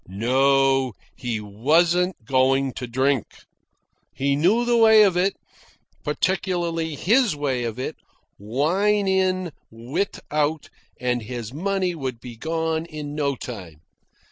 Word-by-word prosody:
No; 135 Hz, +5 st, +2 dB, 0.2 s
he 120 Hz, -4 st, -3 dB
wasn't 160 Hz, -, +1 dB
going 135 Hz, +1 st, +2 dB
to 125 Hz, -, -6 dB
drink. 130 Hz, +1 st, -1 dB, 0.7 s
He 140 Hz, +1 st, 0 dB
knew 195 Hz, +11 st, +3 dB
the 240 Hz, 0 st, +2 dB
way 220 Hz, -2 st, +7 dB
of 195 Hz, -4 st, +3 dB
it, 185 Hz, +2 st, +1 dB, 0.7 s
particularly 165 Hz, 0 st, -1 dB
his 225 Hz, -, +2 dB
way 135 Hz, -4 st, -1 dB
of 115 Hz, 0 st, -4 dB
it, 130 Hz, +4 st, -4 dB, 0.4 s
wine 180 Hz, -, +1 dB
in, 185 Hz, -2 st, +1 dB, 0.2 s
wit 120 Hz, -, -3 dB
out, 150 Hz, +1 st, -1 dB, 0.3 s
and 125 Hz, -1 st, 0 dB
his 120 Hz, 0 st, -6 dB
money 185 Hz, +3 st, -1 dB
would 130 Hz, -7 st, -5 dB
be 120 Hz, 0 st, -9 dB
gone 160 Hz, +4 st, -2 dB
in 150 Hz, -2 st, -7 dB
no 145 Hz, -2 st, 0 dB
time. 90 Hz, -11 st, -9 dB
145 Hz, 125 wpm, -23 LUFS, 125-180 Hz, 0.7 s, way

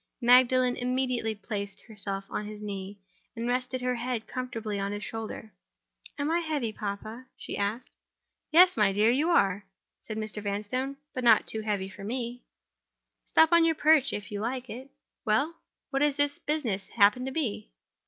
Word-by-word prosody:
Magdalen 250 Hz, 0 st, +5 dB
immediately 250 Hz, -3 st, -1 dB
placed 200 Hz, -1 st, -5 dB
herself 200 Hz, -3 st, -6 dB
on 210 Hz, -, -3 dB
his 210 Hz, 0 st, -8 dB
knee, 200 Hz, -1 st, -6 dB, 0.4 s
and 230 Hz, +1 st, -3 dB
rested 250 Hz, +1 st, -1 dB
her 250 Hz, 0 st, 0 dB
head 240 Hz, -1 st, -3 dB
comfortably 225 Hz, -5 st, -4 dB
on 200 Hz, 0 st, -2 dB
his 205 Hz, +1 st, -4 dB
shoulder. 220 Hz, -1 st, -6 dB, 0.6 s
"Am 290 Hz, +2 st, -1 dB
I 340 Hz, -, +3 dB
heavy, 295 Hz, -9 st, -2 dB
papa?" 215 Hz, +4 st, -6 dB
she -, -, -6 dB
asked. 215 Hz, +5 st, -2 dB, 0.6 s
"Yes, 355 Hz, +3 st, +7 dB
my 210 Hz, -3 st, +4 dB
dear, 210 Hz, +3 st, +4 dB
you 295 Hz, +7 st, +2 dB
are," 200 Hz, -, +3 dB, 0.4 s
said 215 Hz, -, -6 dB
Mr. 215 Hz, -1 st, -4 dB
Vanstone—"but 255 Hz, +7 st, -4 dB
not 225 Hz, -3 st, +6 dB
too 220 Hz, -, -1 dB
heavy 205 Hz, -3 st, -1 dB
for 195 Hz, +1 st, -11 dB
me. 240 Hz, +2 st, -4 dB, 0.8 s
Stop 320 Hz, +1 st, +4 dB
on 340 Hz, -1 st, +6 dB
your 325 Hz, -1 st, +3 dB
perch, 305 Hz, -3 st, +4 dB
if 205 Hz, -1 st, -5 dB
you 205 Hz, -, -3 dB
like 250 Hz, +2 st, -3 dB
it. 260 Hz, +4 st, -8 dB, 0.3 s
Well? 220 Hz, +3 st, +3 dB
And 330 Hz, -, -11 dB, 0.4 s
what 275 Hz, 0 st, 0 dB
may 295 Hz, -, +5 dB
this 290 Hz, 0 st, -1 dB
business 240 Hz, -11 st, -2 dB
happen 210 Hz, +3 st, +4 dB
to 265 Hz, -, -3 dB
be?" 260 Hz, -, -3 dB
235 Hz, 170 wpm, -28 LUFS, 210-265 Hz, 0.8 s, Yes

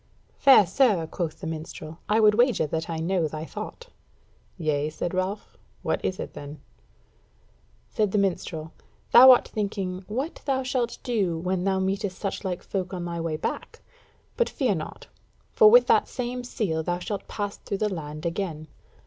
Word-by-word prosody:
"Fair 265 Hz, -7 st, +7 dB
sir," 195 Hz, -3 st, +2 dB
quoth 160 Hz, -1 st, -4 dB
the -, -, -6 dB
minstrel, 160 Hz, 0 st, -7 dB
"I 215 Hz, +1 st, +3 dB
would 210 Hz, -1 st, +6 dB
wager 240 Hz, -6 st, +3 dB
that 160 Hz, +2 st, -3 dB
I 165 Hz, -, -2 dB
know 170 Hz, 0 st, 0 dB
thy 155 Hz, +1 st, -6 dB
thought." 480 Hz, -, -8 dB, 0.7 s
"Yea," 150 Hz, -3 st, 0 dB
said 170 Hz, +3 st, -4 dB
Ralph, 185 Hz, +3 st, -3 dB, 0.3 s
"what -, -, -1 dB
is 185 Hz, -, -2 dB
it -, -, -6 dB
then?" 145 Hz, +1 st, -9 dB, 1.3 s
Said 210 Hz, -3 st, 0 dB
the 210 Hz, -, +1 dB
minstrel: 170 Hz, -5 st, -2 dB, 0.4 s
"Thou 260 Hz, +2 st, +10 dB
art 250 Hz, -, +7 dB
thinking 195 Hz, -3 st, -3 dB
what 265 Hz, +10 st, -4 dB
thou 265 Hz, -2 st, 0 dB
shalt 255 Hz, -2 st, -1 dB
do 200 Hz, -9 st, 0 dB
when 180 Hz, +2 st, -1 dB
thou 195 Hz, -1 st, +2 dB
meetest 190 Hz, 0 st, -1 dB
suchlike 190 Hz, -2 st, -3 dB
folk 185 Hz, -1 st, -3 dB
on 175 Hz, -1 st, -4 dB
thy 170 Hz, -1 st, -4 dB
way 165 Hz, -2 st, -2 dB
back; -, -, -5 dB, 0.6 s
but 480 Hz, -, +2 dB
fear -, -, 0 dB
not, -, -, -6 dB, 0.5 s
for 435 Hz, -2 st, +7 dB
with 485 Hz, +3 st, +7 dB
that -, -, +3 dB
same 250 Hz, 0 st, -4 dB
seal 190 Hz, -9 st, -2 dB
thou 175 Hz, +2 st, -1 dB
shalt 200 Hz, +2 st, -5 dB
pass 205 Hz, -1 st, -4 dB
through 200 Hz, -, -4 dB
the 210 Hz, -1 st, -1 dB
land 155 Hz, -2 st, -6 dB
again." 165 Hz, -3 st, -3 dB
190 Hz, 170 wpm, -26 LUFS, 165-215 Hz, 1.3 s, Thou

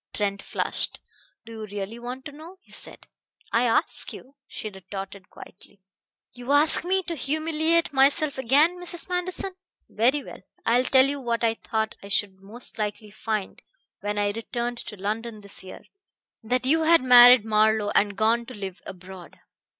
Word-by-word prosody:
Trent 200 Hz, -1 st, -1 dB
flushed. -, -, -3 dB, 0.5 s
"Do 230 Hz, -, -11 dB
you 220 Hz, -1 st, -7 dB
really 205 Hz, +3 st, -6 dB
want 250 Hz, +2 st, -7 dB
to 295 Hz, -, -7 dB
know?" 320 Hz, +6 st, -13 dB
he -, -, -23 dB
said. -, -, -3 dB, 0.5 s
"I 235 Hz, +2 st, +3 dB
ask 230 Hz, -, 0 dB
you," 265 Hz, -, -12 dB
she 220 Hz, -, -6 dB
retorted 195 Hz, -1 st, -9 dB
quietly. 195 Hz, +1 st, -14 dB, 0.5 s
"You 245 Hz, +3 st, -3 dB
ask 300 Hz, +2 st, +4 dB
me 380 Hz, +2 st, 0 dB
to 345 Hz, -, -4 dB
humiliate 315 Hz, +2 st, 0 dB
myself 280 Hz, +1 st, +3 dB
again, 295 Hz, +8 st, +3 dB
Mrs. 350 Hz, -1 st, -1 dB
Manderson. 365 Hz, +1 st, -2 dB, 0.4 s
Very 255 Hz, +6 st, +1 dB
well. -, -, -11 dB, 0.2 s
I 230 Hz, +1 st, +3 dB
will 255 Hz, -, +1 dB
tell 260 Hz, 0 st, +5 dB
you 280 Hz, 0 st, -2 dB
what 235 Hz, -2 st, -2 dB
I 225 Hz, -1 st, +3 dB
thought 220 Hz, -1 st, -3 dB
I 200 Hz, -, -10 dB
should 195 Hz, -1 st, 0 dB
most 225 Hz, +4 st, -4 dB
likely 210 Hz, 0 st, -4 dB
find 215 Hz, -2 st, -4 dB, 0.4 s
when 205 Hz, 0 st, -4 dB
I 205 Hz, 0 st, +1 dB
returned 235 Hz, +2 st, -4 dB
to 210 Hz, -, -6 dB
London 215 Hz, +3 st, -4 dB
this 200 Hz, -1 st, -5 dB
year: 185 Hz, -, -11 dB, 0.6 s
that 250 Hz, +2 st, -1 dB
you 320 Hz, +5 st, +3 dB
had 330 Hz, -2 st, +4 dB
married 245 Hz, -2 st, +8 dB
Marlowe 215 Hz, -1 st, +2 dB
and 200 Hz, -1 st, +2 dB
gone 230 Hz, +2 st, +1 dB
to 255 Hz, -, -9 dB
live 195 Hz, -2 st, -7 dB
abroad." 185 Hz, -1 st, -11 dB
235 Hz, 170 wpm, -25 LUFS, 205-280 Hz, 0.6 s, married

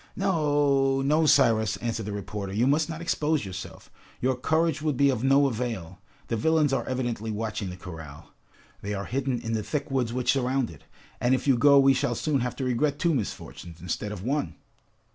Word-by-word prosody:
"No, 145 Hz, -7 st, +2 dB
no! 155 Hz, +3 st, +3 dB
Cyrus," 115 Hz, -7 st, +4 dB
answered 115 Hz, -3 st, -3 dB
the -, -, -3 dB
reporter, 100 Hz, -1 st, -5 dB
"you 110 Hz, +5 st, +1 dB
must 145 Hz, +3 st, +2 dB
not 165 Hz, 0 st, -5 dB
expose 155 Hz, -5 st, 0 dB
yourself! 90 Hz, -1 st, -8 dB, 0.3 s
Your 130 Hz, +1 st, +1 dB
courage 160 Hz, +3 st, +1 dB
would 150 Hz, -4 st, -1 dB
be 140 Hz, +1 st, +4 dB
of 125 Hz, -2 st, -3 dB
no 135 Hz, +1 st, +5 dB
avail. 110 Hz, -9 st, -3 dB, 0.3 s
The 115 Hz, -, -1 dB
villains 150 Hz, +4 st, +2 dB
are 130 Hz, -3 st, +1 dB
evidently 120 Hz, -4 st, -2 dB
watching 105 Hz, -2 st, -3 dB
the 90 Hz, -, -8 dB
corral, 80 Hz, -5 st, -10 dB, 0.5 s
they 105 Hz, +1 st, -3 dB
are 100 Hz, 0 st, -4 dB
hidden 130 Hz, -1 st, -1 dB
in 115 Hz, -, -4 dB
the 110 Hz, -, 0 dB
thick 140 Hz, +7 st, -3 dB
woods 125 Hz, -4 st, 0 dB
which 125 Hz, +1 st, +1 dB
surround 130 Hz, -3 st, 0 dB
it, 75 Hz, -, -15 dB, 0.3 s
and 125 Hz, +2 st, +3 dB
if 130 Hz, -, -4 dB
you 135 Hz, -, +5 dB
go 140 Hz, +4 st, +6 dB
we 135 Hz, 0 st, +6 dB
shall 120 Hz, -2 st, 0 dB
soon 145 Hz, +3 st, 0 dB
have 125 Hz, 0 st, -2 dB
to 135 Hz, -, -4 dB
regret 135 Hz, +4 st, 0 dB
two 170 Hz, -1 st, +1 dB
misfortunes 90 Hz, -, -5 dB
instead 90 Hz, +5 st, -4 dB
of 100 Hz, -3 st, -7 dB
one!" 140 Hz, +5 st, -1 dB
125 Hz, 200 wpm, -26 LUFS, 110-140 Hz, 0.5 s, go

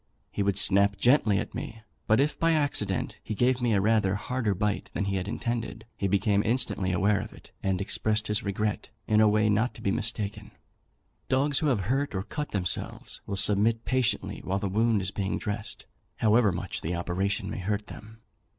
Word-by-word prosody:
He -, -, -2 dB
would 100 Hz, -1 st, +1 dB
snap 100 Hz, +1 st, +4 dB
gently 120 Hz, -6 st, +4 dB
at 105 Hz, -, -3 dB
me, 110 Hz, -1 st, -6 dB, 0.2 s
but 110 Hz, -, +4 dB
if, 145 Hz, +2 st, +1 dB
by 165 Hz, 0 st, +3 dB
accident, 140 Hz, -11 st, 0 dB
he 110 Hz, -, -5 dB
gave 125 Hz, +3 st, +2 dB
me 115 Hz, -4 st, +2 dB
rather 105 Hz, -1 st, +2 dB
a -, -, -1 dB
harder 115 Hz, -2 st, -1 dB
bite 105 Hz, +2 st, -1 dB
than 100 Hz, -, 0 dB
he 100 Hz, 0 st, -1 dB
had 95 Hz, +1 st, -3 dB
intended, 115 Hz, +1 st, -3 dB
he 100 Hz, -, -1 dB
became 100 Hz, +1 st, +2 dB
instantly 115 Hz, -6 st, 0 dB
aware 100 Hz, +2 st, +2 dB
of 110 Hz, -, -8 dB
it, -, -, -16 dB
and 95 Hz, -2 st, 0 dB
expressed 105 Hz, +2 st, 0 dB
his 105 Hz, 0 st, +1 dB
regret 105 Hz, +1 st, -2 dB, 0.2 s
in 110 Hz, 0 st, +3 dB
a 110 Hz, -, +6 dB
way 105 Hz, +1 st, +3 dB
not 110 Hz, +4 st, +1 dB
to -, -, -10 dB
be 100 Hz, -, +1 dB
mistaken. 105 Hz, 0 st, -3 dB, 0.8 s
Dogs 140 Hz, +2 st, +2 dB
who 155 Hz, -, 0 dB
have 125 Hz, -8 st, +2 dB
hurt 130 Hz, +5 st, -1 dB
or 95 Hz, -, -1 dB
cut 150 Hz, +7 st, -5 dB
themselves 90 Hz, -4 st, -3 dB
will 100 Hz, -, -2 dB
submit 110 Hz, +4 st, +2 dB
patiently 130 Hz, -3 st, 0 dB
while 95 Hz, +1 st, -1 dB
the 100 Hz, -, -2 dB
wound 110 Hz, +1 st, +2 dB
is 95 Hz, -, -2 dB
being 100 Hz, -1 st, -2 dB
dressed, 105 Hz, +1 st, -5 dB, 0.3 s
however 110 Hz, -1 st, +4 dB
much 90 Hz, +1 st, -4 dB
the 85 Hz, +3 st, -2 dB
operation 95 Hz, +3 st, -1 dB
may -, -, -4 dB
hurt 105 Hz, +2 st, -2 dB
them. 110 Hz, 0 st, -12 dB
105 Hz, 195 wpm, -28 LUFS, 100-115 Hz, 0.8 s, a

